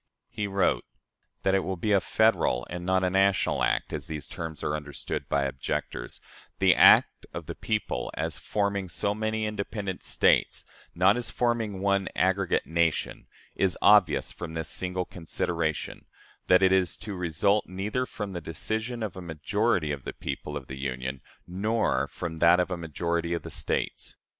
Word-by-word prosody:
He 105 - -2
wrote: 95 -11 +1 0.6
"That 95 - +2
it 95 - +4
will 95 -1 -3
be 105 +5 -1
a 100 -2 +5
federal 100 - +2
and 90 0 -5
not 95 +1 +2
a 90 - +2
national 95 0 +2
act, - - 0
as - - -4
these 75 -3 -5
terms 80 -1 -6
are 75 - 0
understood 75 -2 -5
by 70 - +2
objectors 65 -1 -4 0.4
the - - +5
act - - +6
of 85 - -5
the 85 - -5
people, 105 - -2
as - - -2
forming 100 -2 -1
so 100 +4 -1
many 110 +1 -1
independent 100 -2 -4
States, - - +2 0.3
not 95 +5 +4
as 120 - -3
forming 115 -5 -1
one 100 -1 +2
aggregate 95 0 +1
nation 80 +1 0 0.3
is 95 -2 +1
obvious 100 -7 +5
from 80 -2 -7
this 80 -1 -3
single 90 0 -2
consideration, 80 -2 -3 0.4
that 90 +1 +5
it 95 - +5
is 95 -3 +2
to 105 - -6
result 90 +4 +1
neither 105 +7 -2
from 105 -3 -5
the 85 - -4
decision 110 +9 -3
of 105 -4 -4
a 95 - -7
majority 85 +1 0
of 70 -2 -4
the - - -5
people 75 0 -5
of 70 - -8
the 65 0 -8
Union 65 0 -4 0.2
nor 95 - 0
from 80 0 -6
that 85 +2 +5
of 90 +1 0
a - - 0
majority 85 +1 -2
of 85 - -5
the - - -7
States. - - -3
90 Hz, 170 wpm, -27 LUFS, 80-100 Hz, 0.6 s, act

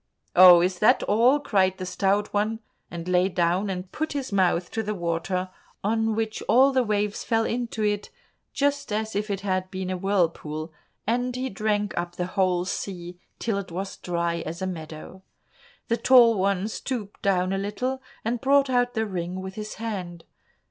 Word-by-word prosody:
"Oh, 180 -1 +9
is 180 0 0
that 215 - +4
all!" 240 +7 +4
cried 190 -8 +1
the 185 - -5
Stout 195 +3 0
One, 215 +2 0 0.3
and 170 0 -7
lay 180 +1 +3
down 180 +2 +1
and 185 -1 -5
put 315 -1 -3
his 275 -4 -4
mouth 185 -3 +1
to 225 - -1
the 210 0 -3
water, 180 +1 -2 0.3
on 220 +1 +1
which 220 0 -2
all 265 +3 +6
the 260 -1 +3
waves 210 -2 -1
fell 225 -1 +1
into 235 -2 -2
it 205 -1 -1 0.4
just 285 -2 0
as 215 0 -2
if 210 +1 -1
it 195 -1 -2
had 185 -1 -1
been 185 -1 -4
a 185 - -2
whirlpool, 165 -5 -1 0.3
and 245 +2 0
he 260 +1 -3
drank 205 0 -1
up 175 0 -3
the 180 - -2
whole 180 -2 +1
sea 180 -2 -5 0.2
till 220 -4 -1
it 190 -3 -8
was 190 +3 -3
as - - -11
dry 170 -1 -1
as 165 +2 -6
a 190 - -2
meadow. 165 +1 -7 0.7
The 230 - +1
Tall 240 0 +6
One 195 0 +1
stooped 220 -2 -5
down 185 -1 +1
a 195 - -1
little, 250 +7 -3 0.2
and 235 +1 -1
brought 275 0 +3
out 245 -1 +1
the 220 0 +1
ring 180 -2 -4
with 190 0 -6
his 215 +1 -6
hand. 185 -7 -5
200 Hz, 185 wpm, -25 LUFS, 180-225 Hz, 0.7 s, Oh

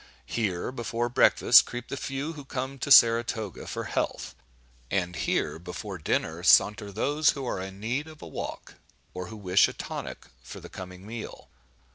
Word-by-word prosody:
Here, 100 -3 -2
before 120 -1 -2
breakfast, 120 - +6
creep 120 0 -7
the - - -3
few 140 +3 -4
who 145 -3 -9
come 135 0 -5
to 140 - -3
Saratoga 115 - +4
for - - -4
health; - - -3 0.6
and 90 -2 -1
here, 80 - -1
before 90 +2 -7
dinner, 75 - -1
saunter 105 0 +4
those 145 +9 +2
who 135 -2 -6
are 95 - -3
in 95 +1 -8
need 125 +8 -2
of 155 -1 -13
a - - -8
walk, - - -7 0.4
or 90 0 -6
who 110 - -9
wish 95 -2 +4
a - - -7
tonic - - -7 0.2
for 60 - -10
the - - -11
coming 90 0 -9
meal. 115 +1 -8
110 Hz, 170 wpm, -27 LUFS, 95-130 Hz, 0.6 s, breakfast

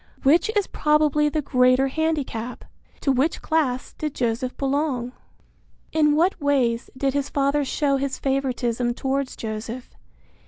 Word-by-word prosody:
Which 325 +9 +4
is 410 -2 +2
probably 300 0 +2
the 305 0 -2
greater 255 0 +3
handicap? 275 -6 -2 0.4
To 275 - +2
which 270 +5 0
class 275 -6 0
did 305 -2 -4
Joseph 240 +1 -1
belong? 275 -3 -1 0.8
In 300 -2 +3
what 345 +2 +2
ways 260 -5 +1
did 270 0 0
his 280 -1 -1
father 280 +1 +1
show 275 0 +1
his 270 0 -2
favoritism 250 -3 -1
towards 270 0 -2
Joseph? 225 +3 -6
275 Hz, 130 wpm, -23 LUFS, 250-300 Hz, 0.8 s, Which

